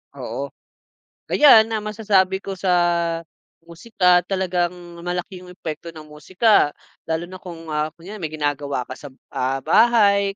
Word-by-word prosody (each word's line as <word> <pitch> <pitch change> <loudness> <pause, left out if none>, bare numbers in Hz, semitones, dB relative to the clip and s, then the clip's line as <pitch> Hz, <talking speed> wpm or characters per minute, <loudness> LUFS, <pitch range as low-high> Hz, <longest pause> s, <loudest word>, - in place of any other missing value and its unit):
Oo. - - -5 0.8
Ayan, 225 -7 +7
na 220 - 0
masasabi 200 -3 +1
ko 195 - -5
sa 185 0 -1 1.0
musika, 180 0 +2
talagang 180 -3 0 0.3
malaki 180 +1 -4
'yong 180 - -12
epekto 170 -1 -7
ng 155 -2 -12
musika. 165 +4 +2 0.4
Lalo 160 +1 -1
na 185 - -9
kung, 165 -2 -10
ah, 150 +1 -1
kunwari 180 +5 -10
may 160 -2 -4
ginagawa 145 -4 -2
ka 130 - -7
sa 145 - -11
b 130 - -25 0.2
ah, 130 +1 -1
bahay 200 -4 +4
180 Hz, 145 wpm, -21 LUFS, 155-200 Hz, 1.0 s, Ayan